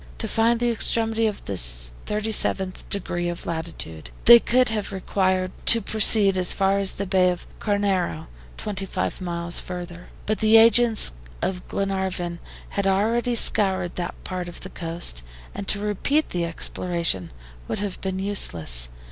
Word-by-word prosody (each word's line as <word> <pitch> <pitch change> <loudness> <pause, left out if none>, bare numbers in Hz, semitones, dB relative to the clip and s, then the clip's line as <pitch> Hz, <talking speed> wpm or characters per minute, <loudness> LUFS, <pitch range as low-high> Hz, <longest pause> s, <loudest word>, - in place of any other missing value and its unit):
To - - -3
find 230 +1 +2
the 240 0 +1
extremity 225 0 +2
of 210 - -5
the 100 - -4
37th 100 - -2
degree 175 -3 -3
of 175 - -6
latitude, 160 - -6 0.2
they 235 0 +10
would 255 0 +4
have 215 -2 -3
required 185 -1 -1 0.2
to 230 - +8
proceed 210 -2 +5
as 180 -1 +2
far 195 +1 +1
as 195 -1 +2
the 200 - -4
Bay 185 -1 +3
of 180 -1 -4
Carnero, 195 -6 -1 0.3
twenty 200 -2 -5 0.3
miles 170 -1 -2
further. 175 -1 -8 0.2
But 215 0 -1
the 220 +1 +6
agents 230 - +5 0.3
of 180 -1 -3
Glenarvan 190 -3 -3 0.3
had 200 -1 -2
already 230 +5 +1
scoured 190 -5 +2
that 175 -1 -4
part 180 -1 -5
of 175 - -12
the - - -8
coast, 165 - -3 0.3
and 200 - -7
to - - 0
repeat 210 +9 0
the 175 -1 -2
exploration 170 - -1 0.4
would - - -3
have 200 -2 -5
been 190 -1 -3
useless. 80 - -1
190 Hz, 150 wpm, -23 LUFS, 175-210 Hz, 0.4 s, they